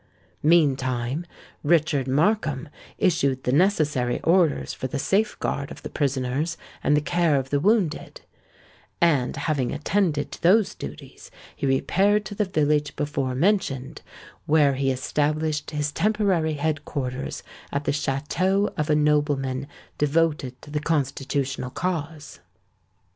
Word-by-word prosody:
Meantime, 135 Hz, -2 st, +2 dB, 0.4 s
Richard 150 Hz, -4 st, +2 dB
Markham 155 Hz, -1 st, +1 dB, 0.3 s
issued 140 Hz, -8 st, +1 dB
the 125 Hz, -, 0 dB
necessary 150 Hz, -7 st, +2 dB
orders 170 Hz, -3 st, +2 dB
for 130 Hz, -, -4 dB
the 130 Hz, -, -4 dB
safeguard 195 Hz, -5 st, 0 dB
of -, -, -11 dB
the -, -, -6 dB
prisoners 140 Hz, +3 st, -1 dB, 0.3 s
and 145 Hz, -, +3 dB
the -, -, +2 dB
care 170 Hz, 0 st, +2 dB
of 135 Hz, -1 st, -1 dB
the 145 Hz, -, +2 dB
wounded; 190 Hz, -3 st, 0 dB, 0.8 s
and, 145 Hz, -8 st, +2 dB
having 140 Hz, -3 st, -1 dB
attended 160 Hz, -2 st, 0 dB
to -, -, -9 dB
those 195 Hz, +4 st, +4 dB
duties, 70 Hz, +1 st, -10 dB, 0.3 s
he 140 Hz, -, -2 dB
repaired 195 Hz, +10 st, +2 dB
to 205 Hz, -, -6 dB
the 210 Hz, +1 st, 0 dB
village 150 Hz, -5 st, +1 dB
before 140 Hz, -3 st, -2 dB
mentioned, 145 Hz, -5 st, 0 dB, 0.5 s
where 150 Hz, -2 st, +4 dB
he 135 Hz, 0 st, 0 dB
established 150 Hz, +3 st, -1 dB
his 150 Hz, -1 st, -2 dB
temporary 195 Hz, -5 st, +1 dB
head 150 Hz, 0 st, -1 dB
quarters 130 Hz, -2 st, -4 dB, 0.3 s
at 140 Hz, +1 st, -1 dB
the -, -, 0 dB
château 155 Hz, +8 st, 0 dB
of 150 Hz, +1 st, -1 dB
a 150 Hz, -, +4 dB
nobleman 145 Hz, -3 st, +1 dB, 0.3 s
devoted 150 Hz, -4 st, +1 dB
to 145 Hz, -, -11 dB
the 150 Hz, 0 st, -1 dB
Constitutional 140 Hz, -3 st, -1 dB
cause. 160 Hz, -1 st, -4 dB
150 Hz, 130 wpm, -24 LUFS, 135-165 Hz, 0.8 s, those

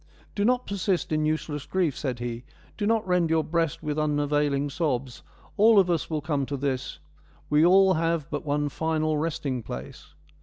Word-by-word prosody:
' -, -, -29 dB
Do 205 Hz, -, 0 dB
not 250 Hz, +3 st, +2 dB
persist 190 Hz, -3 st, -1 dB
in 155 Hz, 0 st, +1 dB
useless 155 Hz, -2 st, -3 dB
grief/ 180 Hz, -7 st, 0 dB
said 130 Hz, -5 st, -3 dB
he, 120 Hz, 0 st, -5 dB, 0.2 s
' -, -, -28 dB
do 205 Hz, -, 0 dB
not 225 Hz, -1 st, +1 dB
rend 180 Hz, -2 st, +2 dB
your 160 Hz, -1 st, +2 dB
breast 165 Hz, -2 st, -1 dB
with 150 Hz, 0 st, -2 dB
un 150 Hz, -1 st, +1 dB
availing 145 Hz, -1 st, 0 dB
sobs; 135 Hz, -5 st, -2 dB, 0.4 s
all 220 Hz, +1 st, +6 dB
of 185 Hz, -3 st, +5 dB
us 165 Hz, -, -1 dB
will 155 Hz, -2 st, -2 dB
come 145 Hz, -2 st, -1 dB
to 140 Hz, -, -3 dB
this; 135 Hz, -2 st, -3 dB, 0.5 s
we 150 Hz, +1 st, +5 dB
all 190 Hz, +2 st, +6 dB
have 165 Hz, -3 st, 0 dB
but 145 Hz, -, -3 dB
one 145 Hz, 0 st, 0 dB
final 155 Hz, +1 st, -1 dB
resting 145 Hz, -5 st, -2 dB
place.' 65 Hz, -, -9 dB
155 Hz, 195 wpm, -26 LUFS, 145-170 Hz, 0.5 s, all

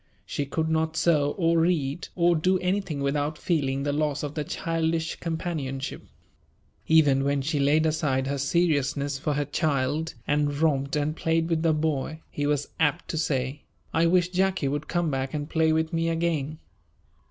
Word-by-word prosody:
She 145 Hz, -, -3 dB
could 160 Hz, +3 st, -1 dB
not 160 Hz, 0 st, 0 dB
sew 145 Hz, -4 st, +2 dB
or 165 Hz, -2 st, +3 dB
read 160 Hz, -3 st, 0 dB
or 175 Hz, -1 st, +3 dB
do 185 Hz, +4 st, +2 dB
anything 180 Hz, -5 st, -1 dB
without 145 Hz, +2 st, -1 dB
feeling 140 Hz, -6 st, 0 dB
the 145 Hz, 0 st, 0 dB
loss 150 Hz, -1 st, -1 dB
of 145 Hz, -1 st, -4 dB
the 150 Hz, -, -2 dB
childish 165 Hz, 0 st, -1 dB
companionship. 160 Hz, -6 st, -4 dB, 0.9 s
Even 145 Hz, -4 st, +5 dB
when 140 Hz, 0 st, 0 dB
she 150 Hz, +1 st, -1 dB
laid 150 Hz, +3 st, +3 dB
aside 150 Hz, -4 st, +1 dB
her 140 Hz, +1 st, -2 dB
seriousness 140 Hz, -2 st, +1 dB
for 150 Hz, +2 st, -1 dB
her 145 Hz, 0 st, 0 dB
child 150 Hz, +1 st, -1 dB
and 145 Hz, -1 st, +1 dB
romped 140 Hz, -3 st, +1 dB
and 150 Hz, +1 st, 0 dB
played 165 Hz, 0 st, 0 dB
with 160 Hz, -1 st, +1 dB
the 165 Hz, -1 st, +3 dB
boy, 155 Hz, 0 st, -1 dB
he 145 Hz, 0 st, -2 dB
was 145 Hz, -1 st, 0 dB
apt 160 Hz, +1 st, +1 dB
to 160 Hz, -, -2 dB
say, 135 Hz, -2 st, -1 dB, 0.3 s
"I 165 Hz, +1 st, +3 dB
wish 180 Hz, 0 st, +3 dB
Jacky 185 Hz, -4 st, +1 dB
would 145 Hz, +2 st, -2 dB
come 175 Hz, -2 st, 0 dB
back 135 Hz, +1 st, -2 dB
and 145 Hz, -1 st, -3 dB
play 160 Hz, 0 st, +2 dB
with 160 Hz, +1 st, 0 dB
me 165 Hz, 0 st, +1 dB
again." 160 Hz, -3 st, -1 dB
155 Hz, 175 wpm, -26 LUFS, 140-165 Hz, 0.9 s, Even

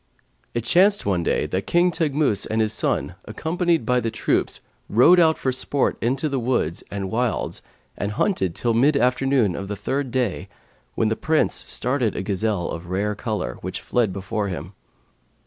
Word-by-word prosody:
It 120 Hz, -, -1 dB
chanced 190 Hz, -, +3 dB
one 95 Hz, -4 st, +1 dB
day -, -, 0 dB
that 95 Hz, +1 st, -3 dB
King 175 Hz, +1 st, +3 dB
Teghmus 150 Hz, -, +1 dB
and 110 Hz, -, -1 dB
his 110 Hz, -1 st, +1 dB
son -, -, -1 dB
accompanied 170 Hz, -3 st, 0 dB
by 125 Hz, +2 st, +2 dB
the 115 Hz, -, -1 dB
troops 110 Hz, -, 0 dB, 0.3 s
rode 150 Hz, -, +6 dB
out 160 Hz, -2 st, +4 dB
for 130 Hz, -, 0 dB
sport 135 Hz, +2 st, 0 dB
into 135 Hz, +6 st, 0 dB
the 135 Hz, -3 st, -1 dB
woods 120 Hz, -9 st, -1 dB
and 95 Hz, -2 st, -4 dB
wilds 120 Hz, 0 st, -1 dB, 0.3 s
and 100 Hz, +1 st, -3 dB
hunted 95 Hz, -, 0 dB
till 120 Hz, -1 st, 0 dB
mid 140 Hz, +6 st, +4 dB
afternoon 125 Hz, -6 st, +2 dB
of 100 Hz, -, -5 dB
the 105 Hz, -, -3 dB
third 130 Hz, +7 st, -2 dB
day, 120 Hz, -6 st, -1 dB, 0.5 s
when 110 Hz, -, +1 dB
the 110 Hz, -, 0 dB
Prince 155 Hz, +5 st, +1 dB
started 125 Hz, -4 st, -1 dB
a -, -, -3 dB
gazelle 100 Hz, -2 st, -1 dB
of 85 Hz, +1 st, -6 dB
a -, -, -11 dB
rare 100 Hz, +3 st, 0 dB
colour, 105 Hz, -, -4 dB
which -, -, -4 dB
fled 120 Hz, -5 st, +1 dB
before 100 Hz, +2 st, -3 dB
him. 90 Hz, 0 st, -6 dB
115 Hz, 180 wpm, -23 LUFS, 100-140 Hz, 0.5 s, rode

